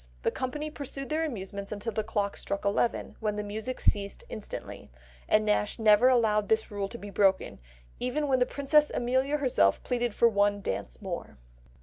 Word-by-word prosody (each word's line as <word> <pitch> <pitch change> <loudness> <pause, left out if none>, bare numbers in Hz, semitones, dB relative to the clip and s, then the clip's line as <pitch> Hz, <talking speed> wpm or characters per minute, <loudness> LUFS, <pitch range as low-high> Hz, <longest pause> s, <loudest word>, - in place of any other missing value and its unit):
The - - +2
company 295 +4 -4
pursued 275 -2 -6
their 315 +1 0
amusements 200 -7 -6
until 210 +2 -3
the 215 0 -1
clock 205 -2 -1
struck 200 +1 -4
eleven, 205 +4 0
when 210 -2 -1
the 210 - -3
music 220 +5 -5
ceased 200 - 0
instantly; - - -7 0.4
and 215 0 +4
Nash 210 0 +1
never 220 +2 +6
allowed 215 -4 +2
this 220 -1 +1
rule 200 -1 -2
to 235 - -7
be 205 -2 -9
broken, 195 -1 +2 0.4
even 290 +4 -1
when 260 -2 +2
the 250 - +3
Princess 295 +2 +3
Amelia 260 +4 +1
herself 250 - +2
pleaded 240 -3 -1
for 235 - +5
one 205 -2 +2
dance 95 - -5
more. - - -6
220 Hz, 180 wpm, -29 LUFS, 205-260 Hz, 0.4 s, never